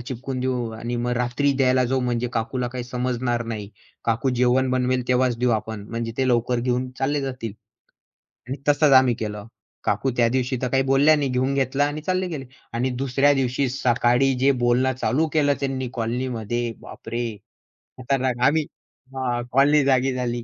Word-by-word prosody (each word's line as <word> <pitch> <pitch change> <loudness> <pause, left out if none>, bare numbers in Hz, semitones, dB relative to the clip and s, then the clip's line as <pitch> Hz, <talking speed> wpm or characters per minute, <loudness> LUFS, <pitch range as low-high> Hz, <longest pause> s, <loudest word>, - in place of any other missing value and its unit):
चिपकून 130 +1 -5
देऊ 125 -3 -1
आणि 120 +2 -4
मग 120 +1 -1
रात्री 125 +4 +1
द्यायला 130 -1 +3
जाऊ 130 +2 0
म्हणजे 125 -1 -1
काकूला 120 +2 -2
काही 125 0 -5
समजणार 125 -1 -1
नाही, 105 -2 -6 0.4
काकू 120 +4 +1
जेवण 125 +1 +2
बनवेल 125 -1 0
तेव्हाच 125 -1 +2
देऊ 125 0 +2
आपण, 110 -2 -2
म्हणजे 115 0 -3
ते 130 - +1
लवकर 120 0 +1
घेऊन 125 +1 -1
चालले 145 +2 0
जातील." 125 -5 -4 1.0
आणि 135 +2 -4
तसंच 145 0 +4
आम्ही 130 -2 +6
केलं. 105 -1 -5 0.4
काकू 105 +6 0
त्यादिवशी 125 +2 +1
तर 125 - 0
काही 135 +2 +2
बोलल्या 135 +3 +4
नाही, 145 -3 -1
घेऊन 130 +2 0
घेतला 135 +1 +1
आणि 145 +1 -3
चालले 185 +3 -1
गेले. 150 -6 -5 0.3
आणि 125 +3 0
दुसऱ्या 135 +2 +2
दिवशी 135 0 0
सकाळी 125 +1 +2
जे 135 +2 +4
बोलणं 125 +2 +3
चालू 140 +5 0
केलं 145 -2 +3
त्यांनी 135 -2 -2
कॉलनीमध्ये, 120 -1 -2
बापरे! 115 -2 -5 0.6
खतरनाक 130 -1 -1
आता 125 - +2
आम्ही 155 +1 +2 0.9
कॉलनी 145 +3 +4
जागी 135 -1 +2
झाली. 120 -2 -2
125 Hz, 165 wpm, -23 LUFS, 120-135 Hz, 1.0 s, आम्ही